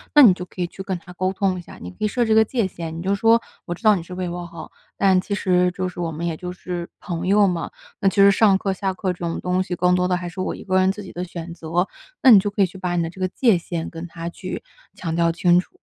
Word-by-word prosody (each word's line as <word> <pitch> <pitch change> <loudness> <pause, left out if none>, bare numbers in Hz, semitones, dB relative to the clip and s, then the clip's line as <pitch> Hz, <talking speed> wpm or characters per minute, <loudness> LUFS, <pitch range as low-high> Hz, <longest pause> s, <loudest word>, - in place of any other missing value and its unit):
那 295 - +10
你 200 -7 +8
就 180 - -6
可 180 - -16
以 180 - +1
去 185 +2 -9
跟 190 -2 -3
他 180 +1 -13
沟 185 +1 -1
通 190 -2 0
一 - - -7
下， - - -13
你 90 - -8
可 - - -20
以 215 - +1
设 240 +2 0
置 220 - -1
一 - - +5
个 220 - +7
界 230 -1 -1
限， 165 -3 -6
你 170 - -5
就 195 +2 +1
说 225 +3 +4 0.3
我 175 - -3
知 210 - -20
道 215 -1 +6
你 180 - -3
是 180 +2 -9
为 180 0 -3
我 175 0 -5
好， 170 - -10 0.3
但 190 -2 +4
其 200 +1 -3
实 180 -2 +2
就 185 0 -3
是 180 - -8
我 165 -1 -2
们 160 +3 -4
也 165 -2 -1
就 180 +2 -6
是 180 -1 -6
朋 175 -1 -4
友 205 +1 +5
嘛， 175 -2 -2 0.3
那 195 - +3
其 - - -8
实 200 0 +7
上 195 -1 +4
课 195 0 -1
下 190 0 -2
课 185 -2 -1
这 - - -15
种 170 -1 -3
东 180 +1 0
西 185 -1 -3
更 180 +1 +2
多 180 0 +2
的 180 - +1
还 180 -1 -5
是 180 +2 -6
我 - - -2
一 - - -10
个 185 -1 +2
人 185 0 +3
自 205 +1 -7
己 190 - -10
的 180 - -4
选 170 -1 -7
择， 170 +2 -1 0.4
那 260 - +9
你 210 - +10
就 205 +2 -1
可 200 0 +1
以 - - +5
去 185 +1 -10
把 180 -1 -2
你 170 - +1
的 165 - -4
这 185 - -11
个 185 - +2
界 200 -1 +2
限 165 -1 -5
跟 165 +1 -7
他 165 0 -7
去 185 +2 -6 0.3
强 165 -2 -3
调 170 0 +3
清 175 +1 +4
楚。 - - -8
180 Hz, 340 characters per minute, -22 LUFS, 175-195 Hz, 0.4 s, 那